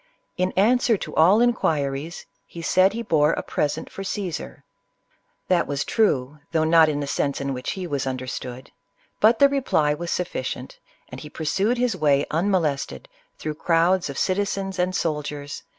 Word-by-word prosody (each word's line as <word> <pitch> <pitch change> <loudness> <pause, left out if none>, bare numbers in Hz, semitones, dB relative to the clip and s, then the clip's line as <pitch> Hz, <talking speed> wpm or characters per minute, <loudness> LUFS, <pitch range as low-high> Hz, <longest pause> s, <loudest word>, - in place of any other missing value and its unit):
In 185 +1 0
answer 230 +3 +3
to - - -7
all 185 +8 +5
inquiries, 155 - 0 0.2
he 170 - -9
said 185 +4 +3
he 235 +1 -4
bore 155 -6 +3
a - - -3
present 145 - -2
for - - -9
CsesM 195 -3 -5 0.8
That 180 -2 +2
was 140 0 -2
true, 150 - +1
though 160 - +2
not 160 0 +5
in 145 -1 -2
the - - -2
sense 140 0 -1
in 140 0 -2
which 125 0 -4
he 190 -2 -5
was 140 -5 -2
understood; 130 -1 -5 0.5
but 220 +2 +5
the 280 - +7
reply 255 - +1
was 170 +3 -5
sufficient, 130 -8 -4 0.3
and 130 - -9
he 150 - -9
pursued 195 +11 0
his 245 -3 +1
way 145 -4 +2
unmolested, 160 - -1 0.3
through 155 - -4
crowds 170 +2 +2
of 140 - -6
citizens 195 0 -1
and 180 +1 0
soldiers, 150 -3 -2
22 145 - -9
CLEOPATRA. 145 - -9
165 Hz, 170 wpm, -23 LUFS, 145-195 Hz, 0.8 s, the